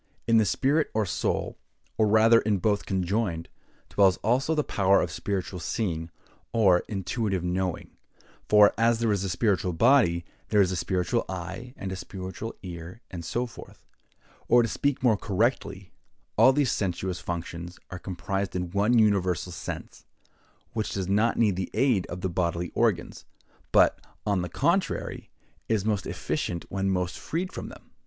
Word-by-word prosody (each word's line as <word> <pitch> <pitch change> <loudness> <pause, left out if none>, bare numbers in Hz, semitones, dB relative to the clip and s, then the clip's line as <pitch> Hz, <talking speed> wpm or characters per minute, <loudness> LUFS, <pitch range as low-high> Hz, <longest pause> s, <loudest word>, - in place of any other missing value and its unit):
In 115 -1 +4
the 110 - +4
spirit 145 +9 +1
or 110 -1 +2
soul, 90 - -2 0.4
or 110 - +3
rather 110 +2 +6
in 105 -2 +1
both 105 +2 0
conjoined, 95 -2 -1 0.4
dwells, 95 -2 +3
also, 130 +8 +2
the 150 - +1
power 100 -4 +3
of - - -1
spiritual 95 -2 -3
seeing, 80 -3 -2 0.4
or 95 -6 +5
intuitive 95 -1 -2
knowing; 90 0 -2 0.6
for, 105 -1 +7
as 115 0 +4
there 115 -1 +1
is 100 -2 0
a 95 - -2
spiritual 90 -1 +1
body, 95 - +4 0.2
there 105 - +2
is 95 -2 +4
a - - -1
spiritual 90 +6 0
eye, 95 +8 -6
and 95 - -5
a - - -3
spiritual 95 +4 -7
ear, 90 +4 -8
and 85 -3 -6
so 120 +9 -1
forth; 120 - -13 0.6
or, 120 0 +6
to - - 0
speak 140 +4 -1
more 115 -5 +4
correctly, 100 -3 -1 0.4
all 130 - +7
these 140 -1 +2
sensuous 95 -1 -2
functions 85 0 -5
are 95 - -6
comprised 95 +1 -3
in 90 -1 -3
one 105 +5 +3
universal 95 -5 +2
sense, 85 - -7 0.7
which 110 -2 -2
does 95 -2 -2
not 105 +4 +2
need 105 -5 +3
the 95 0 -3
aid 125 -9 +2
of 90 +1 -6
the 95 - 0
bodily 85 -1 -1
organs; - - 0 0.5
but, - - +5 0.3
on 100 -3 +1
the 90 - -4
contrary, 170 - -1 0.4
is 105 -3 +1
most 105 -4 0
efficient 85 -1 -3
when 95 0 -1
most 90 -2 -1
freed 180 +4 -3
from - - -6
them. - - -15
100 Hz, 160 wpm, -27 LUFS, 90-115 Hz, 0.7 s, for